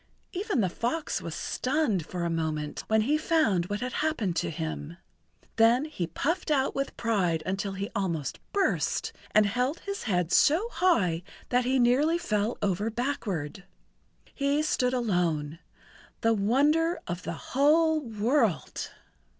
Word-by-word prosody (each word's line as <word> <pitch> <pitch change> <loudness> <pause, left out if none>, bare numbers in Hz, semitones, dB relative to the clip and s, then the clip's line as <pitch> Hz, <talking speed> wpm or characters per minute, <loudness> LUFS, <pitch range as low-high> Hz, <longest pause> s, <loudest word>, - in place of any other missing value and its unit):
Even 390 - -1
the 190 - +2
fox 250 - -2
was 165 -1 -5
stunned 250 - -1
for 180 -1 -4
a - - 0
moment 155 -2 -2
when 220 0 +3
he 290 +7 +1
found 230 - +2
what 205 +3 -3
had 250 +1 -3
happened 265 - -1
to - - 0
him. 80 - -5 0.6
Then 235 +5 +5
he 185 - -4
puffed 325 - -2
out 275 -3 +2
with 275 0 -3
pride 185 -8 0
until 195 +1 -2
he 195 +1 -3
almost 170 - -2
burst, 400 -2 0 0.2
and 215 0 +4
held 250 +9 -1
his 400 0 -5
head 180 -6 0
so 350 +11 +4
high 190 - +2 0.3
that 250 0 +2
he 260 +1 +2
nearly 265 +7 +3
fell 215 -9 -1
over 205 +2 0
backward. 210 - -3 0.7
He 280 +2 +1
stood 255 -4 +1
alone—the 175 +1 -2
wonder 290 - +2
of 175 +1 -4
the - - -4 0.2
whole 310 +4 +4
world! 225 - 0
230 Hz, 140 wpm, -28 LUFS, 180-290 Hz, 0.7 s, Then